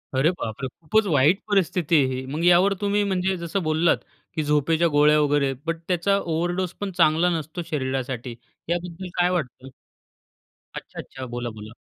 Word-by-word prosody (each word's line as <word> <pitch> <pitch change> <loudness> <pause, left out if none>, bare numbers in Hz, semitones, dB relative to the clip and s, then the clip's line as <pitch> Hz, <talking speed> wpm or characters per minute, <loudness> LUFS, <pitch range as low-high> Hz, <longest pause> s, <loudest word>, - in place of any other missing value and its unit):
अरे 135 +5 +4
बापरे! 130 -6 -5
खूपच 215 +7 +2
वाईट 150 +6 +4
परिस्थिती 180 -4 +1
आहे 130 - -2
ही. 130 +1 -5
मग 150 +5 -4
यावर 180 +3 +5
तुम्ही 205 0 +1
म्हणजे 190 -1 0
जसं 170 +2 -3
बोललात, 160 +2 +2 0.4
की 155 - 0
झोपेच्या 150 +3 +2
गोळ्या 150 0 +4
वगैरे 145 -2 +2
बट 165 0 -1
त्याचा 185 +2 +2
ओव्हरडोस 175 +1 -2
पण 200 - -2
चांगला 165 +1 +4
नसतो 160 +3 -6
शरीरासाठी, 130 -4 -3 0.3
याबद्दल 175 +1 -3
काय 175 0 +4
वाटतं? 135 -7 -3 1.1
अच्छा, - - -9
अच्छा. 130 - -8
बोला, 120 0 -4
बोला. 110 0 -10
160 Hz, 155 wpm, -24 LUFS, 135-180 Hz, 1.1 s, यावर